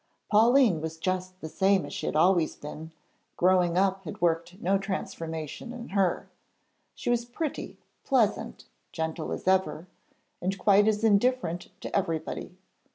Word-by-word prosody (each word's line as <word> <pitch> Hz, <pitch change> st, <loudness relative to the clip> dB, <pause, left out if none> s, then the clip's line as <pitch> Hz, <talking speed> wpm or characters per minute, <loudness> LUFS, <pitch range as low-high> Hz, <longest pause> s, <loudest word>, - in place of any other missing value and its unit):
Pauline 225 Hz, -, +5 dB
was 160 Hz, 0 st, -5 dB
just 185 Hz, +2 st, -3 dB
the 160 Hz, -, -5 dB
same 190 Hz, +3 st, +2 dB
as -, -, -8 dB
she -, -, -4 dB
had -, -, -2 dB
always 170 Hz, 0 st, +3 dB
been; 155 Hz, +2 st, -8 dB, 0.5 s
'growing 180 Hz, -1 st, +3 dB
up' 190 Hz, 0 st, +2 dB
had 155 Hz, -, -7 dB
worked 170 Hz, +2 st, 0 dB
no 195 Hz, -1 st, +1 dB
transformation 165 Hz, -, -5 dB
in 245 Hz, -1 st, -8 dB
her. 195 Hz, -2 st, +1 dB, 0.7 s
She -, -, -2 dB
was 240 Hz, -1 st, +1 dB
pretty, 270 Hz, +5 st, -5 dB, 0.3 s
pleasant, 240 Hz, -7 st, +1 dB, 0.3 s
gentle 160 Hz, -1 st, -3 dB
as -, -, -5 dB
ever, 190 Hz, -3 st, +2 dB, 0.6 s
and 190 Hz, +2 st, -1 dB
quite 205 Hz, +2 st, +4 dB
as 215 Hz, 0 st, +1 dB
indifferent 205 Hz, -5 st, +2 dB
to -, -, -5 dB
everybody. 165 Hz, -1 st, -2 dB
185 Hz, 145 wpm, -28 LUFS, 165-210 Hz, 0.7 s, Pauline